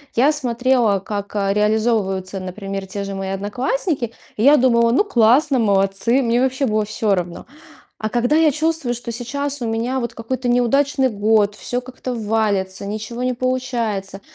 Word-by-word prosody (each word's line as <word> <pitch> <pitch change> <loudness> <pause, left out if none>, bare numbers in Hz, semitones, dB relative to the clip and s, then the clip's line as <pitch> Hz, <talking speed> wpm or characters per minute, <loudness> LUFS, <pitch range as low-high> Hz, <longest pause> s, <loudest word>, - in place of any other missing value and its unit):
Я 270 +6 +4
смотрела, 245 -6 +1
как, 200 +1 -6
а, 195 -1 +1
реализовываются, 210 -3 0
например, 195 +1 -5
те 200 +1 -5
же 195 0 -5
мои 195 0 -4
одноклассники. 245 - -2 0.3
И 215 - 0
я 290 +3 +7
думала: 235 -3 +3
"Ну, 275 - +3
классно, 265 - +3
молодцы". 200 +3 +2
Мне 235 0 +1
вообще 260 +1 +1
было 215 -1 +1
всё 210 -1 0
равно. 175 -1 -5 0.5
А 215 - -1
когда 245 +5 +1
я 315 -2 +4
чувствую, 310 -4 -1
что 240 0 -6
сейчас 280 +4 -3
у 235 - -2
меня 230 +4 -1
вот 235 -2 -4
какой-то 250 +2 -3
неудачный 265 +3 +2
год, 210 -1 +2
всё 245 - -2
как-то 255 0 -6
валится, 205 -4 -1
ничего 220 +4 -4
не 255 - +1
получается, 235 -6 -2
230 Hz, 165 wpm, -20 LUFS, 205-255 Hz, 0.5 s, я